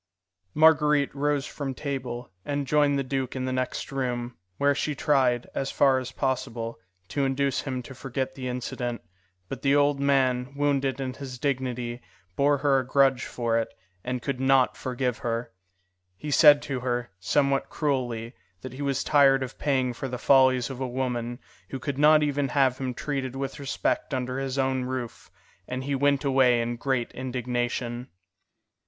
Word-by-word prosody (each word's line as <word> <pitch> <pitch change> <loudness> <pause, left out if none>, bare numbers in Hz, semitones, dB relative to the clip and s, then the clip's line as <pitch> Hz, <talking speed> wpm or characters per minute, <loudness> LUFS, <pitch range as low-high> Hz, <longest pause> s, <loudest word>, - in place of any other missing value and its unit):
Marguerite 150 -2 +4
rose 145 0 0
from 135 -3 -5
table, 125 -5 -5
and 145 -1 -2
joined 145 0 +3
the 140 - 0
duke 130 -1 -3
in 130 -1 -2
the 130 - -2
next 130 +2 -3
room, 125 -3 -2 0.2
where 140 0 +3
she 145 +1 -2
tried, 130 -4 +2
as 135 - -2
far 135 -2 +3
as 130 0 -6
possible, 120 -5 -2 0.3
to 140 - -1
induce 135 0 0
him 130 -2 -4
to 135 - -10
forget 130 0 -4
the 130 -2 -6
incident, 125 -1 -4 0.4
but - - -6
the 140 0 +3
old 145 -1 +3
man, 135 -1 +1
wounded 140 -2 0
in 130 -1 -3
his 130 -2 -8
dignity, 125 -3 -2 0.3
bore 145 +1 +3
her 140 -1 +3
a - - -2
grudge 135 -1 +3
for 115 -1 0
it, 115 - -3 0.3
and 125 -1 -3
could 140 -3 -2
not 130 -1 +3
forgive 125 -1 -2
her. 115 0 -3 0.7
He 150 - -5
said 145 0 +7
to 135 -3 -3
her, 120 -3 -2
somewhat 140 +7 +1
cruelly, 125 -6 -2 0.3
that 130 -1 -8
he 135 - -7
was 140 -2 0
tired 135 -2 +5
of 130 - -8
paying 130 -4 +1
for 135 - -5
the 125 -1 -4
follies 130 -1 +4
of 130 - -7
a 130 - -1
woman 120 -1 -2 0.3
who 135 - -4
could 135 +1 -4
not 150 +1 +6
even 145 -1 0
have 130 -1 +2
him 130 -2 -3
treated 135 -3 -3
with 135 +1 -4
respect 135 -1 -1
under 130 0 -2
his 135 0 -3
own 130 -1 +1
roof, 125 -2 -5 0.4
and 130 +1 -4
he 140 +1 -2
went 140 +1 +2
away 130 -3 +4
in 120 +1 -1
great 130 -2 -1
indignation. 125 -1 -3
130 Hz, 170 wpm, -26 LUFS, 125-140 Hz, 0.7 s, said